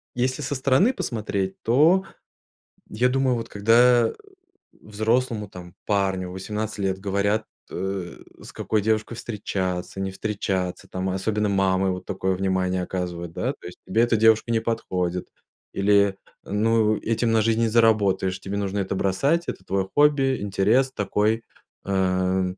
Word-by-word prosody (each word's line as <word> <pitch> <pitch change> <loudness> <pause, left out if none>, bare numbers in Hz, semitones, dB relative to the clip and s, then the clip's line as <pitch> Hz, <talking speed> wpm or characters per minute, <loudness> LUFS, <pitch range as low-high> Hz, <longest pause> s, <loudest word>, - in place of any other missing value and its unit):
если 130 +3 -1
со 145 0 -3
стороны 135 - +3
посмотреть, 100 - -3
то 155 +11 +4 0.9
я 125 +4 +1
думаю, 130 -1 +1
вот 115 0 -6
когда 115 +3 +4 0.6
взрослому, 110 +1 -1
там 90 -2 -12
парню 95 -3 0
в - - -8
18 105 +3 -4
лет 95 -1 0
говорят, 100 +2 0 0.2
э, 95 -1 -4 0.2
с - - -10
какой 110 -1 -1
девушкой 110 +2 0
встречаться, 95 -5 -4
не 95 - -2
встречаться, 95 -3 -3
там 95 +1 -3
особенно 105 +2 -1
мамы 95 -1 +2
вот 90 0 -6
такое 95 -1 -1
внимание 95 -1 0
оказывают, 90 -2 -4
да, - - -2
то - - -12
есть: 90 - -11
"Тебе 115 - +2
эта 120 -1 +3
девушка 110 +1 +4
не 115 - +2
подходит" 90 -6 -2 0.4
или: 100 0 +3 0.3
"Ну, 110 +1 +2
этим 115 +1 0
на 110 -1 +3
жизнь 115 0 +1
не 115 - +3
заработаешь, 105 -5 +2
тебе 100 +1 -5
нужно 100 0 -2
это 95 0 -2
бросать, 140 - +1
это - - -5
твое 95 0 -1
хобби, 140 -4 +3
интерес 105 +7 +2
такой". 105 0 0 0.4
Э, 100 - -4
м, 95 -1 0
105 Hz, 150 wpm, -24 LUFS, 95-115 Hz, 0.9 s, то